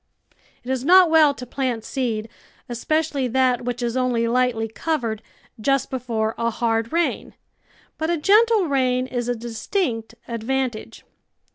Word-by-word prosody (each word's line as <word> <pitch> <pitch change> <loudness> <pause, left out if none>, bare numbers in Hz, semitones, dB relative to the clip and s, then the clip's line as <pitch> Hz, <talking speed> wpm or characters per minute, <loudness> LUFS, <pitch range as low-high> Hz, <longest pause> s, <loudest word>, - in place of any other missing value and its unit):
It 250 - -4
is 260 -1 -1
not 360 +2 +6
well 315 -2 +6
to 250 - -8
plant 250 -3 -2
seed, 230 -5 -2 0.4
especially 275 +2 -1
that 250 -1 +1
which 245 0 -3
is 235 0 -1
only 250 -2 +1
lightly 240 -2 +1
covered, 230 -3 -2 0.4
just 275 +4 0
before 230 -4 -2
a 230 0 +1
hard 225 0 -1
rain, 340 +1 -1 0.6
but 315 +1 -1
a 345 - +1
gentle 425 +5 +4
rain 255 -4 +1
is 245 -2 -3
a 245 - 0
distinct 230 - -3
advantage. 240 0 -3
250 Hz, 140 wpm, -22 LUFS, 230-280 Hz, 0.6 s, not